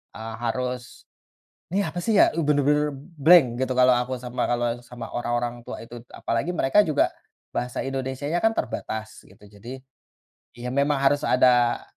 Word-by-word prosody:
eee, 110 Hz, 0 st, -7 dB
harus, 125 Hz, 0 st, -4 dB, 0.7 s
nih 200 Hz, -, +2 dB
apa 175 Hz, -, -4 dB
sih 220 Hz, +4 st, 0 dB
ya, -, -, +6 dB
eee, 165 Hz, +1 st, -2 dB
bener-bener 150 Hz, 0 st, +2 dB, 0.2 s
blank 160 Hz, 0 st, +7 dB
gitu 130 Hz, 0 st, 0 dB
kalau 125 Hz, 0 st, +5 dB
aku 125 Hz, +1 st, -1 dB
sama 125 Hz, 0 st, -2 dB
kalau 120 Hz, 0 st, -1 dB
sama 120 Hz, -2 st, -8 dB
orang 120 Hz, 0 st, -3 dB
orang 120 Hz, 0 st, -2 dB
tua -, -, -6 dB
itu 120 Hz, +1 st, -10 dB, 0.2 s
apalagi 115 Hz, +9 st, -1 dB
mereka 135 Hz, +5 st, +3 dB
juga, 150 Hz, -2 st, +2 dB, 0.4 s
bahasa 125 Hz, 0 st, -3 dB
Indonesianya 135 Hz, +4 st, -3 dB
kan 225 Hz, -, +4 dB
terbatas 110 Hz, 0 st, -5 dB
gitu 110 Hz, -, -20 dB, 0.2 s
jadi, 125 Hz, +5 st, -8 dB, 0.8 s
ya 120 Hz, +1 st, -5 dB
memang 140 Hz, +2 st, +1 dB
harus 145 Hz, +1 st, +3 dB
ada 125 Hz, -1 st, +3 dB
130 Hz, 160 wpm, -24 LUFS, 120-145 Hz, 0.8 s, blank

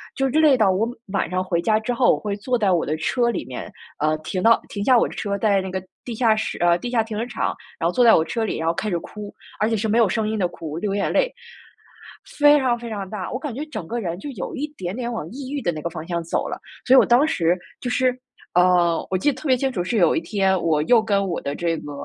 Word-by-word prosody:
就 270 Hz, -, 0 dB
是 265 Hz, -, 0 dB
累 295 Hz, -5 st, +5 dB
到 205 Hz, -4 st, +4 dB
我 215 Hz, +5 st, 0 dB, 0.2 s
晚 195 Hz, -, 0 dB
上 185 Hz, +1 st, -1 dB
回 170 Hz, -2 st, -1 dB
家 215 Hz, +3 st, +2 dB
之 220 Hz, +3 st, -2 dB
后， 245 Hz, 0 st, +4 dB
我 -, -, -7 dB
会 205 Hz, -1 st, -3 dB
坐 245 Hz, +4 st, -1 dB
在 200 Hz, -4 st, +2 dB
我 175 Hz, -, +2 dB
的 155 Hz, +2 st, -2 dB
车 240 Hz, +9 st, +1 dB
里 235 Hz, -, -3 dB
面， 125 Hz, -, -7 dB, 0.3 s
呃， 155 Hz, +1 st, +1 dB
停 180 Hz, +4 st, -4 dB
到 230 Hz, +3 st, +5 dB
停 200 Hz, -1 st, -4 dB
下 255 Hz, 0 st, +5 dB
我 -, -, +3 dB
的 -, -, -9 dB
车， 200 Hz, -1 st, -2 dB
在 200 Hz, -2 st, +2 dB
那 190 Hz, -, -5 dB
个 190 Hz, 0 st, -4 dB, 0.2 s
地 240 Hz, -, -6 dB
下 220 Hz, -2 st, +3 dB
室 215 Hz, -, -3 dB
呃， 175 Hz, 0 st, +3 dB
地 245 Hz, -, -4 dB
下 235 Hz, -2 st, +2 dB
停 220 Hz, -1 st, -7 dB
车 -, -, 0 dB
场， 240 Hz, -, -2 dB, 0.2 s
然 165 Hz, -, 0 dB
后 175 Hz, -, -1 dB
坐 250 Hz, -, +3 dB
在 230 Hz, -, +7 dB
我 160 Hz, -, +2 dB
车 230 Hz, +6 st, -2 dB
里， 220 Hz, -, -2 dB
然 160 Hz, -, -2 dB
后 165 Hz, -, +2 dB
开 215 Hz, -, -3 dB
始 175 Hz, -, 0 dB
哭， 210 Hz, +4 st, -8 dB, 0.3 s
而 215 Hz, +2 st, +2 dB
且 225 Hz, -, 0 dB
是 220 Hz, +2 st, -1 dB
没 225 Hz, +3 st, +2 dB
有 215 Hz, -5 st, +4 dB
声 220 Hz, -2 st, 0 dB
音 215 Hz, 0 st, -2 dB
的 180 Hz, -, +2 dB
哭， 160 Hz, -2 st, -7 dB
流 200 Hz, +1 st, -2 dB
眼 200 Hz, -, -1 dB
泪。 -, -, +2 dB, 1.1 s
非 290 Hz, 0 st, +7 dB
常 250 Hz, -3 st, +1 dB
非 235 Hz, -, -7 dB
常 200 Hz, -3 st, -5 dB
大， 205 Hz, -4 st, -5 dB
我 255 Hz, -, -3 dB
感 295 Hz, -1 st, -4 dB
觉 285 Hz, +6 st, -5 dB
整 300 Hz, -, -7 dB
个 240 Hz, -, -3 dB
人， 175 Hz, -3 st, -4 dB
就 290 Hz, -, -7 dB
有 215 Hz, -9 st, -6 dB
一 290 Hz, +2 st, -3 dB
点 180 Hz, +2 st, -4 dB
点 240 Hz, -1 st, -3 dB
往 220 Hz, -9 st, -4 dB
抑 265 Hz, +2 st, -7 dB
郁 290 Hz, -, -2 dB
的 175 Hz, -, 0 dB
那 155 Hz, -, -6 dB
个 170 Hz, -, -3 dB
方 160 Hz, -1 st, -7 dB
向 170 Hz, -1 st, -2 dB
走 165 Hz, -, -2 dB
了。 -, -, -5 dB, 0.3 s
所 255 Hz, -, +4 dB
以 -, -, +8 dB
我 -, -, +6 dB
当 250 Hz, +6 st, +4 dB
时 175 Hz, -, +1 dB, 0.2 s
就 250 Hz, -, -4 dB
是， 255 Hz, 0 st, +1 dB, 0.4 s
呃， 180 Hz, -1 st, +3 dB
我 190 Hz, -, +1 dB
记 290 Hz, +11 st, +2 dB
得 260 Hz, -, -8 dB
特 310 Hz, -, -4 dB
别 255 Hz, -1 st, +4 dB
清 270 Hz, +1 st, -1 dB
楚， 180 Hz, -7 st, -2 dB
是 225 Hz, +5 st, -1 dB
有 175 Hz, -4 st, +4 dB
一 -, -, 0 dB
天 190 Hz, +2 st, +1 dB
我 155 Hz, -3 st, +1 dB
又 230 Hz, +6 st, +5 dB
跟 200 Hz, -2 st, 0 dB
我 170 Hz, -, -3 dB
的 140 Hz, -, -4 dB
这 170 Hz, 0 st, -1 dB
个， 145 Hz, -, -8 dB
210 Hz, 315 characters per minute, -22 LUFS, 175-240 Hz, 1.1 s, 以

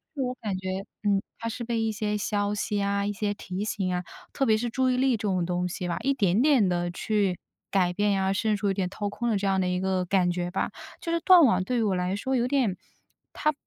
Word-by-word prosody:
自 275 Hz, -, -2 dB
我 250 Hz, -1 st, -1 dB
感 200 Hz, -4 st, -2 dB
觉 185 Hz, 0 st, -5 dB, 0.3 s
嗯， 200 Hz, -1 st, +2 dB, 0.2 s
它 230 Hz, -, -3 dB
是 235 Hz, +2 st, -5 dB
被 230 Hz, -1 st, -1 dB
一 225 Hz, -, 0 dB
些 210 Hz, -1 st, -1 dB
消 205 Hz, 0 st, -1 dB
息 205 Hz, 0 st, -2 dB
呀、 200 Hz, 0 st, 0 dB
一 205 Hz, -, 0 dB
些 205 Hz, 0 st, -2 dB
提 195 Hz, 0 st, -5 dB
醒 190 Hz, -4 st, -1 dB
啊， 180 Hz, 0 st, -1 dB, 0.3 s
特 270 Hz, -, 0 dB
别 220 Hz, -, +4 dB
是 240 Hz, +2 st, -2 dB
注 260 Hz, +2 st, +1 dB
意 250 Hz, -, +2 dB
力 260 Hz, -2 st, +3 dB
这 -, -, -10 dB
种 185 Hz, -3 st, +1 dB
东 180 Hz, 0 st, -1 dB
西 180 Hz, 0 st, -4 dB
吧， -, -, -1 dB
一 275 Hz, +1 st, +2 dB
点 200 Hz, -4 st, +2 dB
点 265 Hz, -9 st, +4 dB
地 175 Hz, 0 st, 0 dB
去 195 Hz, -1 st, 0 dB, 0.3 s
改 185 Hz, -3 st, +2 dB
变 205 Hz, +3 st, +1 dB
呀， 195 Hz, -1 st, +1 dB
甚至有点 200 Hz, -2 st, 0 dB
掏 205 Hz, +1 st, -3 dB
空 240 Hz, +4 st, -3 dB
了 210 Hz, -, +2 dB
这 200 Hz, -, -2 dB
样 190 Hz, -1 st, +2 dB
的 185 Hz, -, +1 dB
一 180 Hz, 0 st, 0 dB
个 190 Hz, -1 st, 0 dB
感 180 Hz, -1 st, +2 dB
觉 175 Hz, 0 st, -2 dB
吧。 -, -, -1 dB, 0.3 s
就 335 Hz, -, -3 dB
是 335 Hz, -, +1 dB
断 355 Hz, -1 st, +7 dB
网 190 Hz, -6 st, +3 dB
对 250 Hz, +2 st, -1 dB
于 -, -, +1 dB
我 200 Hz, -3 st, +1 dB
来 180 Hz, +2 st, -1 dB
说 260 Hz, +6 st, -1 dB
有 240 Hz, -, +1 dB
点 255 Hz, -8 st, +1 dB, 0.6 s
它 305 Hz, -, +1 dB
205 Hz, 280 characters per minute, -27 LUFS, 185-230 Hz, 0.6 s, 断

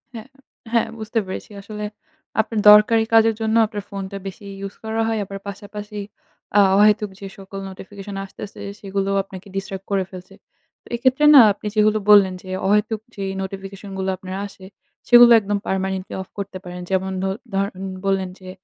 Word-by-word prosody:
হ্যাঁ, 225 Hz, +1 st, -8 dB, 0.5 s
হ্যাঁ 230 Hz, -, +3 dB
বুঝতে 220 Hz, +2 st, -1 dB
পেরেছি। 190 Hz, +3 st, -7 dB
আসলে 210 Hz, +1 st, -6 dB, 0.6 s
আপনার 220 Hz, -1 st, -3 dB
দরকারী 215 Hz, +2 st, +6 dB
কাজের 225 Hz, -1 st, +5 dB
জন্য 220 Hz, 0 st, +1 dB
আপনার 210 Hz, -2 st, -6 dB
ফোনটা 195 Hz, 0 st, -5 dB
বেশি 200 Hz, +2 st, -9 dB
ইউস 195 Hz, 0 st, -6 dB
করা 220 Hz, 0 st, -1 dB
হয়। 225 Hz, -1 st, 0 dB
আবার 195 Hz, +1 st, -7 dB
পাশাপাশি 205 Hz, +1 st, -7 dB, 0.6 s
আ -, -, +8 dB, 0.2 s
অহেতুক 210 Hz, 0 st, +4 dB
যে 195 Hz, -, -7 dB
সকল 195 Hz, 0 st, -8 dB
নোটিফিকেশন 195 Hz, +1 st, -9 dB
আসতেছে 200 Hz, +1 st, -10 dB, 0.2 s
সেগুলো 195 Hz, 0 st, -2 dB
আপনাকে 190 Hz, 0 st, -11 dB
ডিস্ট্রাক্ট 195 Hz, 0 st, -5 dB
করে 195 Hz, -1 st, +2 dB
ফেলছে। 185 Hz, 0 st, -11 dB, 0.5 s
তো -, -, -19 dB
এক্ষেত্রে 260 Hz, +4 st, +2 dB
না 265 Hz, -, +12 dB
আপনি 210 Hz, -, -8 dB
যেগুলো 215 Hz, 0 st, +3 dB
বললেন 200 Hz, -3 st, +7 dB
যে 185 Hz, -, -8 dB, 0.2 s
অহেতুক 210 Hz, +1 st, +1 dB
যে, 200 Hz, -, -5 dB, 0.2 s
নোটিফিকেশন 195 Hz, +1 st, -7 dB
গুলো 190 Hz, 0 st, -2 dB
আপনার 185 Hz, 0 st, -7 dB
আসে 190 Hz, -1 st, -14 dB, 0.4 s
সেগুলো 240 Hz, -1 st, +9 dB
একদম 205 Hz, -1 st, -2 dB
পারমানেন্টলি 190 Hz, 0 st, -2 dB
অফ 190 Hz, -, -9 dB
করতে 200 Hz, -1 st, -5 dB
পারেন। 180 Hz, -1 st, -7 dB
যেমন 190 Hz, 0 st, 0 dB
ধ -, -, 0 dB, 0.3 s
ধরেন, 195 Hz, -1 st, -2 dB, 0.2 s
বললেন 190 Hz, -1 st, 0 dB
যে, 185 Hz, -1 st, -11 dB
200 Hz, 165 wpm, -21 LUFS, 190-215 Hz, 0.6 s, না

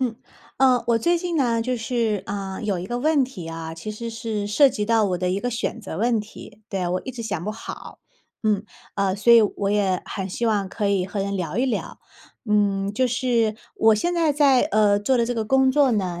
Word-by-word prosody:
嗯。 250 Hz, -3 st, 0 dB, 0.4 s
呃， 255 Hz, -2 st, +4 dB
我 230 Hz, -, +3 dB
最 345 Hz, +9 st, +2 dB
近 345 Hz, -1 st, -3 dB
呢 240 Hz, -5 st, +1 dB
就 250 Hz, +2 st, -1 dB
是， 230 Hz, -4 st, -1 dB
呃， 195 Hz, -1 st, -5 dB
有 205 Hz, -4 st, -1 dB
一 175 Hz, -, -5 dB
个 240 Hz, +4 st, -3 dB
问 300 Hz, +2 st, +3 dB
题 205 Hz, -10 st, -9 dB
啊， 165 Hz, 0 st, -6 dB
其 165 Hz, +6 st, -7 dB
实 230 Hz, +2 st, -6 dB
是 225 Hz, -2 st, -4 dB
涉 275 Hz, +8 st, +5 dB
及 210 Hz, -3 st, -3 dB
到 225 Hz, -1 st, +3 dB
我 185 Hz, -3 st, -1 dB
的 180 Hz, 0 st, -1 dB
一 190 Hz, -, 0 dB
个 245 Hz, -, -2 dB
选 235 Hz, 0 st, -3 dB
择 190 Hz, -7 st, -7 dB
问 230 Hz, +1 st, +2 dB
题。 210 Hz, 0 st, -10 dB
对， 185 Hz, -3 st, -2 dB
我 180 Hz, +1 st, -2 dB
一 260 Hz, -, -4 dB
直 240 Hz, -2 st, -7 dB
想 175 Hz, -6 st, -4 dB
不 210 Hz, -, -2 dB
好， 220 Hz, +1 st, -9 dB, 0.4 s
嗯。 210 Hz, -2 st, +1 dB, 0.3 s
呃， 195 Hz, -2 st, 0 dB
所 215 Hz, +4 st, +4 dB
以 230 Hz, -1 st, +8 dB
我 200 Hz, -1 st, -1 dB
也 195 Hz, -3 st, +1 dB
很 195 Hz, -1 st, -4 dB
希 235 Hz, +5 st, -2 dB
望 205 Hz, -4 st, 0 dB
可 205 Hz, 0 st, -2 dB
以 195 Hz, -2 st, +1 dB
和 200 Hz, +1 st, -4 dB
人 200 Hz, 0 st, -2 dB
聊 175 Hz, +2 st, -3 dB
一 260 Hz, -, +2 dB
聊。 255 Hz, -, -3 dB, 0.5 s
嗯， 200 Hz, -1 st, +1 dB
就 255 Hz, -, +2 dB
是 235 Hz, -3 st, 0 dB, 0.2 s
我 220 Hz, -1 st, +5 dB
现 345 Hz, +11 st, -1 dB
在 330 Hz, -3 st, +2 dB
在， 275 Hz, -3 st, +4 dB
呃， 205 Hz, -1 st, +3 dB
做 245 Hz, +5 st, +1 dB
的 230 Hz, -, +2 dB
这 245 Hz, -, -2 dB
个 225 Hz, -2 st, -1 dB
工 265 Hz, +3 st, +3 dB
作 275 Hz, -1 st, +3 dB
呢， 180 Hz, -5 st, -1 dB
215 Hz, 250 characters per minute, -23 LUFS, 200-245 Hz, 0.5 s, 以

